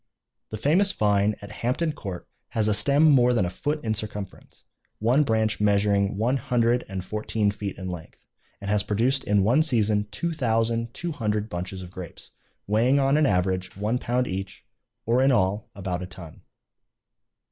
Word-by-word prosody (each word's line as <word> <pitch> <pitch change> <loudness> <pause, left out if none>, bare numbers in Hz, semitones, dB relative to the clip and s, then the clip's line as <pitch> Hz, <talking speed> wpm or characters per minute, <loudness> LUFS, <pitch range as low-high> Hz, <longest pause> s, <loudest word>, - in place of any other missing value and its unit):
The 110 - -5
famous 175 - +3
vine 105 - +2
at 100 - -8
Hampton 150 +7 0
Court 95 -9 -7 0.3
has 110 -2 +2
a 105 - +3
stem 140 +9 +3
more 125 -3 +4
than 110 - +2
a 90 - -3
foot 150 +9 -3
in 110 -2 0
circumference, 105 -2 -7 0.3
one 120 +7 +3
branch 110 -5 +1
measuring 100 -1 +2
one 120 +6 +1
hundred 120 -1 +1
and 95 -1 -5
fourteen 105 0 -1
feet 100 -1 -6
in 95 - -6
length, 85 -2 -8 0.4
and 100 - -8
has 105 0 +2
produced 120 +7 +1
in 100 -1 +2
one 120 +9 +4
season 110 -8 +1
two 170 +7 -3
thousand 115 -4 0
two 175 -1 -3
hundred 105 -6 -2
bunches 90 +1 -5
of 90 - -11
grapes, 90 -3 -10 0.3
weighing 120 +7 +3
on 135 +1 +3
an 150 -1 +4
average 95 -1 -1
one 110 +5 -1
pound 125 +1 0
each, 95 +1 -6 0.4
or 120 +3 +2
in 135 +1 +4
all 105 0 +1
about 90 -2 -3
a 90 - -5
ton. 90 -4 -11
110 Hz, 175 wpm, -25 LUFS, 100-125 Hz, 0.4 s, more